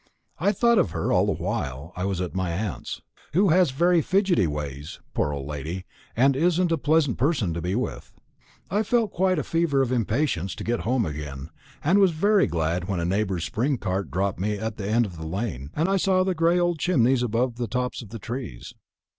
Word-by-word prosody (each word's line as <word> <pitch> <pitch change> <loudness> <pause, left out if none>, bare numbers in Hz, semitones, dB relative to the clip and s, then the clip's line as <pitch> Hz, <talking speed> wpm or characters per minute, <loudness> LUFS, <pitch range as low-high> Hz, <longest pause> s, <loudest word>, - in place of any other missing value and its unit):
I 195 +6 +3
thought 235 +2 +3
of - - +2
her - - -2
all - - +3
the - - +2
while 65 +6 -3
I 90 - -2
was 95 -2 -1
at 90 - -3
my 95 -1 -1
aunt's; 95 +2 -4 0.3
who 190 +4 +4
has 175 0 +4
very 170 +6 +3
fidgety 185 - +2
ways, 75 -1 -5
poor 75 - 0
old 70 -2 -4
lady, 75 +6 -5 0.3
and 135 +3 +4
isn't 175 +3 +2
a 165 - +2
pleasant 145 -3 +2
person 125 - +1
to 85 - -3
be 90 +4 -1
with. 125 - -4 0.6
I 205 +3 +2
felt 220 -1 +1
quite 185 +1 +2
in 160 - 0
a - - -6
fever 165 -4 +1
of 125 - -2
impatience 115 - 0
to - - -6
get 120 +1 -1
home 115 +4 +1
again; 75 -1 -6 0.3
and 180 +7 +4
was 190 -4 +4
very 200 +5 +3
glad 85 +1 -1
when 100 -3 -1
a 85 - -1
neighbour's 95 -2 0
spring 130 +5 0
cart 95 -2 -2
dropped 95 0 -1
me 105 +2 -1
at 110 +1 -4
the 100 -2 -4
end 115 +2 +3
of 90 -5 -8
the 80 0 -6
lane, 85 - -4
and 160 +3 +1
I 195 0 +2
saw 185 0 +3
the 190 0 0
gray 170 +1 +2
old 175 -2 +1
chimneys 130 -8 +3
above 120 +1 0
the 120 -1 -2
tops 125 +4 -2
of 115 - -11
the 115 - -6
trees. 115 - -6
120 Hz, 220 wpm, -25 LUFS, -, 0.6 s, who